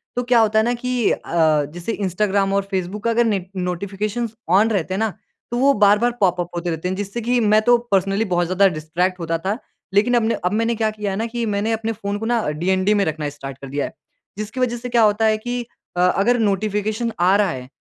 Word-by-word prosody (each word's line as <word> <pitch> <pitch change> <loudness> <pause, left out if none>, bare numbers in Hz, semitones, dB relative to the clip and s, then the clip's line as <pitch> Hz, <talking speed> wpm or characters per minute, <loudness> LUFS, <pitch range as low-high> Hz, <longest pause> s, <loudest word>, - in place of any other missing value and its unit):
तो 245 - 0
क्या 245 -1 +3
होता 220 0 +3
है 220 - +2
ना 240 - +1
कि 250 -1 0
अ, 155 -3 +1
जैसे 175 +5 -4
इंस्टाग्राम 195 0 0
और 200 0 +2
फ़ेसबुक 190 +2 -3
का 230 - +1
अगर 235 +1 +3
ने 200 -5 0
नोटिफ़िकेशन 195 +5 -2 0.2
ऑन 205 +5 +4
रहते 190 -4 -1
हैं 190 - -1
ना 220 -1 +1 0.4
तो 240 - -1
वो 275 +2 +4
बार-बार 210 +4 +4
पॉप-अप 175 -3 +1
होते 175 0 -2
रहते 165 +2 -3
हैं। 185 - -2
जिससे 205 +4 -4
कि 245 +2 +1
मैं 215 -1 +4
तो 240 +2 +5
पर्सनली 195 +2 +2
बहुत 175 -3 +1
ज़्यादा 185 +3 +3
डिस्ट्रैक्ट 180 +2 -2
होता 165 -1 -1
था। 195 +6 -2 0.4
लेकिन 215 +5 +3
अब 235 - +3
ना 230 - +1
अब 180 - +2
मैंने 230 +2 +1
क्या 220 -1 +1
किया 210 -2 -4
है 190 - -3
ना 225 - -1
कि 235 0 -3
मैंने 210 +1 -1
अपने 225 0 -1
फ़ोन 200 -2 -4
को 225 - -4
ना 235 0 +1
डीएनडी 185 +6 +1
में 205 -1 +2
रखना 155 -2 -2
स्टार्ट 135 -2 -8
कर 135 - -9
दिया 140 +1 -2
है। - - -8 0.4
जिसकी 215 +4 -5
वज़ह 240 -1 0
से 245 +1 -6
क्या 235 -1 +3
होता 215 +1 +3
है 215 0 +3
कि 245 +2 -3 0.4
अ, - - 0
अगर 200 +7 +3
नोटिफ़िकेशन 215 +2 0
आ 185 +3 +4
रहा 205 -2 +3
है 125 -4 -7
205 Hz, 240 wpm, -21 LUFS, 180-225 Hz, 0.4 s, तो